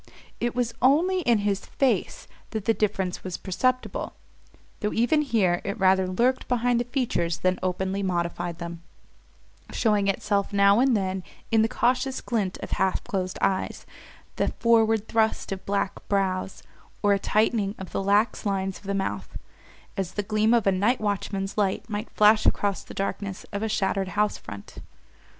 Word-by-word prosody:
It 240 0 -1
was 240 -2 0
only 335 +8 +4
in 240 -10 +3
his 200 -1 0
face 270 -2 -1 0.2
that 220 -3 -4
the 225 - +4
difference 195 -4 -1
was 185 -2 -4
perceptible, 255 +7 -1 0.7
though 210 -1 -1
even 245 +7 +3
here 210 -11 +1
it 200 +3 -3
rather 190 -1 +3
lurked 240 +8 +1
behind 245 -1 +2
the 240 - -1
features 235 - -1
than 185 0 0
openly 190 +2 -1
modified 175 -2 -2
them: 170 -1 -7 0.9
showing 210 -4 +2
itself 200 +1 0
now 200 +1 +5
and 255 -3 +4
then 190 -1 -2 0.3
in 225 -1 +5
the 220 - +3
cautious 255 +3 0
glint 205 -6 -2
of - - -7
half 190 -1 0
closed 185 -2 -3
eyes, 190 -1 0 0.5
the - - +1
forward 225 -2 +3
thrust 220 -2 0
of 190 -1 -5
black 200 -1 0
brows, 190 -1 -1 0.4
or 205 0 +5
a 200 - +1
tightening 215 0 +1
of 190 - -8
the - - -1
lax 205 +3 +2
lines 195 -2 -1
of - - -21
the 200 0 -1
mouth 105 - -3 0.6
as 190 -2 -3
the 205 - -2
gleam 215 +2 +2
of 235 -3 +3
a 195 - +4
night 205 +7 +2
watchman's 200 -1 -2
light 195 -2 0
might 215 0 -4
flash 215 +1 +4
across 200 -1 +1
the - - -12
darkness 195 0 -3
of 200 - -2
a 220 - -1
shuttered 195 -2 0
house 210 +2 0
front. 100 -1 -10
200 Hz, 170 wpm, -26 LUFS, 190-225 Hz, 0.9 s, now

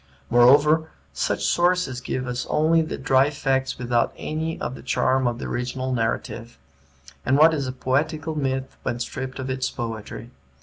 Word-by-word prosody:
Moreover, 145 +6 +5 0.2
such 70 - -1
sources 175 -8 +1
give 130 0 -3
us 125 0 -3
only 160 +2 +3
the 155 - -4
dry 135 0 +3
facts 135 -2 -1
without 120 -1 0
any 160 +1 -3
of - - -3
the - - -10
charm 130 0 +1
of 120 -1 -1
the - - -6
original 130 +1 -3
narrative; 115 0 -3 0.7
and 130 - +2
what 160 +2 +6
is 140 -4 -1
a - - -2
poetical 150 +5 -1
myth 135 -3 -2
when 120 - -2
stripped 130 +2 -5
of 130 -1 -4
its 130 0 -1
poetry? 115 0 -6
130 Hz, 165 wpm, -24 LUFS, 125-150 Hz, 0.7 s, what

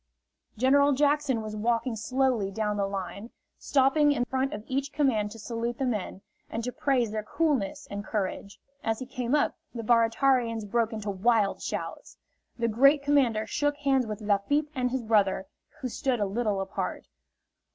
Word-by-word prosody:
General 280 +4 +4
Jackson 285 -4 +2
was 215 0 -5
walking 230 +2 0
slowly 250 -2 0
down 210 +1 -1
the 200 -1 0
line, 195 +3 -5 0.3
stopping 290 +2 +3
in 245 -4 0
front 265 +1 -1
of 210 - -6
each 275 +2 -2
command 245 -9 +1
to 225 - -10
salute 230 +1 -3
the 270 - -1
men 210 -5 -3 0.3
and 230 - -4
to 250 - -2
praise 250 -5 +1
their 215 0 -2
coolness 290 +1 -1
and 200 0 -4
courage. 200 -1 -4 0.2
As 225 0 0
he 260 - -6
came 250 0 -1
up, 295 - +1 0.2
the 230 - -4
Baratarians 230 0 +2
broke 225 +2 0
into 215 -2 -3
wild 205 +1 +2
shouts. - - -5 0.4
The 235 -1 0
great 275 +6 +4
commander 260 -7 +2
shook 290 +6 -1
hands 270 -4 +1
with 215 0 -5
Lafitte 215 +9 +1
and 250 -3 0
his 255 -1 -2
brother, 205 -4 +2 0.4
who 260 - -2
stood 250 0 -1
a 205 - +1
little 205 -1 -1
apart. 190 - -4
235 Hz, 170 wpm, -28 LUFS, 215-270 Hz, 0.4 s, General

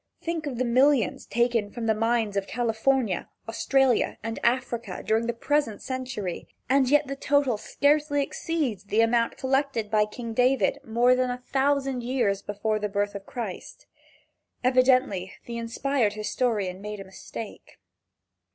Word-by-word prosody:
Think 330 -2 -3
of 260 -4 -4
the 255 - 0
millions 255 -2 +3
taken 235 -2 +1
from 235 +2 -5
the 220 - +3
mines 225 -1 0
of 200 -1 -1
California, 235 -2 0 0.2
Australia 260 +2 +2
and 225 0 -4
Africa 235 -5 -1
during 225 +1 +1
the - - +2
present 235 -1 0
century 255 -8 -4 0.2
and 265 0 +3
yet 295 +1 +4
the 275 0 -4
total 275 -3 +2
scarcely 290 +5 +1
exceeds 275 - -2
the 210 +2 +2
amount 230 0 +2
collected 265 -5 0
by 210 -1 +4
King 230 +2 -7
David 255 +3 +2
more 240 +2 +3
than 255 0 +1
a 245 0 -5
thousand 270 -1 +1
years 235 -5 0
before 215 +1 -2
the 210 0 -2
birth 205 0 -1
of 200 -1 -8
Christ. 220 -7 -7 0.8
Evidently 255 -7 +3
the 235 -1 -5
inspired 230 -1 0
historian 210 -3 -1
made 210 0 -6
a - - -6
mistake. 200 +3 -9
235 Hz, 150 wpm, -26 LUFS, 215-265 Hz, 0.8 s, yet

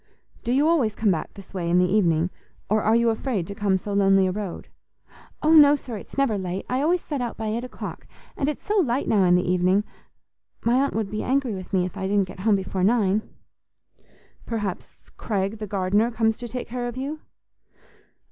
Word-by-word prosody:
"Do 240 - -1
you 280 +4 +3
always 265 -11 +2
come 215 -3 +2
back 165 - -3
this 195 -1 -13
way 175 -3 -2
in 175 - +3
the 180 - +5
evening, 180 -3 +2 0.4
or 215 0 +3
are 220 +2 +3
you 235 0 +3
afraid 220 -5 -2
to 200 - -7
come 200 -2 +1
so 200 +2 -5
lonely 195 -1 +4
a 185 - +1
road?" 195 -2 -5 0.8
"Oh 310 +1 +4
no, 295 -2 +8
sir, 255 -5 -7
it's 205 - -10
never 250 -7 +2
late; 185 0 -4
I 255 +2 0
always 345 +4 +2
set 290 -4 -3
out 240 - -4
by 220 -1 -3
eight 230 +3 -2
o'clock, 250 - -8 0.3
and 280 - 0
it's 300 - -6
so 420 0 +2
light 265 -6 0
now 205 -3 +3
in 180 0 +5
the 180 - +1
evening. 185 +3 +2 0.8
My 235 - +3
aunt 280 - -2
would 220 -3 -2
be 215 - -2
angry 260 -3 0
with 185 -2 -7
me 185 -2 +2
if 180 - -7
I 190 - -2
didn't 200 -1 +2
get 185 - -11
home 210 +2 +3
before 190 -1 -2
nine." 210 -1 +3 1.3
"Perhaps 210 -5 -4 0.2
Craig, 200 0 -2
the 215 - -5
gardener, 200 +3 +1
comes 225 -1 +1
to 240 - -6
take 250 +1 -5
care 245 +1 -3
of 240 +1 -6
you?" 285 +4 -4
215 Hz, 215 wpm, -24 LUFS, 190-245 Hz, 1.3 s, no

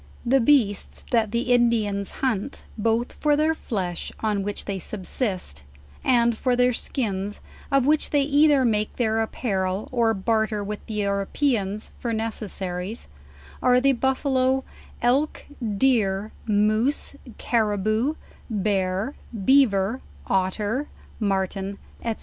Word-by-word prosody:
The 265 +3 +4
beasts 230 -6 +2
that 225 -3 +3
the 240 +2 +1
Indians 220 -5 +2 0.2
hunt, 245 +1 -2
both 225 +2 0
for 300 -1 +2
their 310 +2 +2
flesh, 190 - -4
on 210 -2 0
which 205 +1 -4
they 195 -2 -3
subsist, 185 - -3 0.4
and 235 -2 +3
for 250 +2 +1
their 250 0 +3
skins, 205 -5 -2 0.3
of 275 -2 +3
which 300 +1 +2
they 290 -2 +3
either 290 -1 +4
make 215 -2 0
their 225 -2 +1
apparel, 195 -4 -1
or 230 -3 +2
barter 220 +1 0
with 210 +1 -5
the 220 - -5
Europeans 205 +1 0
for 235 -2 -2
neces* 220 -1 -3
saries, 185 +4 -4 0.6
are 250 0 +5
the 275 +2 +4
buffalo, 265 0 +1 0.4
elk, 270 +6 +1 0.3
deer, 215 -5 +2 0.2
moose, 215 +7 +1 0.2
carriboo, 215 +4 +1 0.3
bear, 195 +2 0 0.3
bea 275 +3 +7
ver, 200 +3 -1 0.2
otter, 205 +8 0 0.3
martin, 195 -1 -1 0.3
&c. 230 -1 -1
220 Hz, 125 wpm, -24 LUFS, 200-255 Hz, 0.6 s, bea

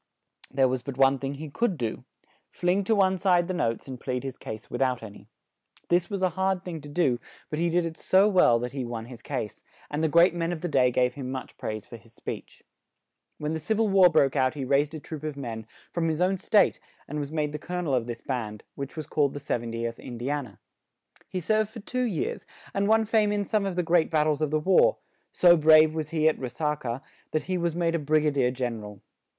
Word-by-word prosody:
There 135 -1 +3
was 130 0 -1
but 135 +1 -7
one 135 0 +4
thing 135 +1 -3
he 155 +3 -7
could 205 0 0
do: 115 -4 -4 0.4
fling 180 +3 0
to 220 - +3
one 190 -2 +3
side 180 -2 +3
the 185 - -2
notes 115 -10 -1
and 130 -2 -7
plead 125 0 -3
his 135 -2 -5
case 110 -2 -8
without 125 -1 -1
an 105 -2 -8
y. - - -16 0.6
This 175 0 +2
was 200 -2 -3
a 185 - +3
hard 190 +1 -1
thing 165 -4 -5
to 145 - -10
do; 145 -6 +1 0.3
but 150 - -2
he 170 +1 +2
did 175 0 +1
it 160 -1 -6
so 190 +2 +4
well, 180 - +5
that 125 +1 -4
he 135 -1 -4
won 120 -2 -5
his 120 -1 -11
case; 120 -7 -5 0.3
and 150 +2 -1
the - - +4
great 170 +3 +5
men 170 0 -1
of 165 -3 -4
the 175 - -2
day 130 -5 +3
gave 125 0 +1
him 130 -2 -6
much 130 -1 -6
praise 110 -1 -5
for 120 - -10
his 115 0 -21
speech. - - -8 0.7
When 150 +1 -3
the 160 - -2
Civ 215 +8 -1
il 225 -1 +2
War 190 -2 +7
broke 140 -5 +3
out 130 +2 +2
he 140 -3 -3
raised 140 +3 +1
a - - -5
troop 155 0 -8
of 155 -2 -4
men, 115 -5 -6 0.2
from 170 -1 0
his 160 -1 -1
own 185 +2 +2
state, 205 +3 +3 0.3
and 150 +1 -4
was 145 0 -4
made 150 -2 -1
the 150 - -5
col 180 +4 -5
o - - 0
nel 155 -6 -1
of 125 -2 +1
this 115 -1 -5
band, 110 -5 -4
which 140 +3 -7
was 155 - -4
called 145 -2 +1
the - - -4
"70th 115 -3 -3
In 120 - -8
di 125 +4 -2
an 145 -3 -2
a." 100 - -19 0.7
He 185 - -3
served 215 +4 +1
for 220 - -9
two 250 +4 -2
years, 195 -10 -3 0.3
and 200 0 +1
won 220 +1 +4
fame 215 -1 +2
in 205 -1 0
some 205 -1 0
of 190 - -3
the 180 - +1
great 165 -1 +3
bat 155 -2 +2
tles 155 -1 0
of 155 - +1
the 155 +1 +1
war; 330 - +4 0.3
so 175 -1 +6
brave 155 -1 +6
was 155 -2 -3
he 155 -1 +2
at 160 - +2
Re 130 - -3
sa 150 +4 -1
ca, 125 -3 -5 0.3
that 155 - +1
he 185 - -2
was 170 -1 -1
made 170 -1 +1
a 170 - +1
Brig 155 +1 +2
a 150 - +3
dier 135 -3 +2
Gen 125 -3 -3
er - - -10
al. 105 -2 -10
150 Hz, 255 wpm, -27 LUFS, 130-175 Hz, 0.7 s, War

